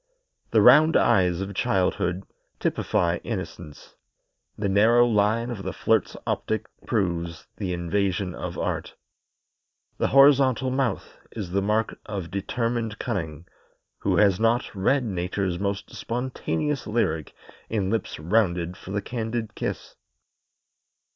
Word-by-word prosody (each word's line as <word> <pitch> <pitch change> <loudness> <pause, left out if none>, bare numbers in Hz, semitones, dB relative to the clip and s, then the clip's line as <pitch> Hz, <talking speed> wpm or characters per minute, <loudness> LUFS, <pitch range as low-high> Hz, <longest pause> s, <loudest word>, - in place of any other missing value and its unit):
The 110 -3 +4
round 150 +7 +7
eyes 90 -2 +3
of 100 +1 -4
childhood 95 -3 0 0.4
typify 85 -1 0
innocence; 75 - -7 0.6
the 100 - -1
narrowed 115 +5 +4
line 110 +4 +2
of 110 -5 -5
the 95 -1 -4
flirt's - - +1
optic - - -1 0.2
proves 85 -5 -1
the 95 -2 -3
invasion 90 +1 -1
of - - -6
art. - - -3 1.0
The - - +2
horizontal 135 -2 +5
mouth 130 -2 -2
is 100 -6 -5
the 100 +2 +1
mark 105 +2 0
of 95 -5 -5
determined 115 +2 -2
cunning; 85 - -4 0.5
who - - +1
has 100 -3 +4
not 115 +3 +1
read 125 +8 +2
Nature's 95 -3 -2
most 100 0 -3
spontaneous 125 - -2
lyric 80 - -1 0.3
in 100 -3 -1
lips 115 -3 -2
rounded 90 -1 +1
for - - -12
the 100 +1 -2
candid 115 -2 -3
kiss? - - -4
100 Hz, 120 wpm, -25 LUFS, 90-115 Hz, 1.0 s, round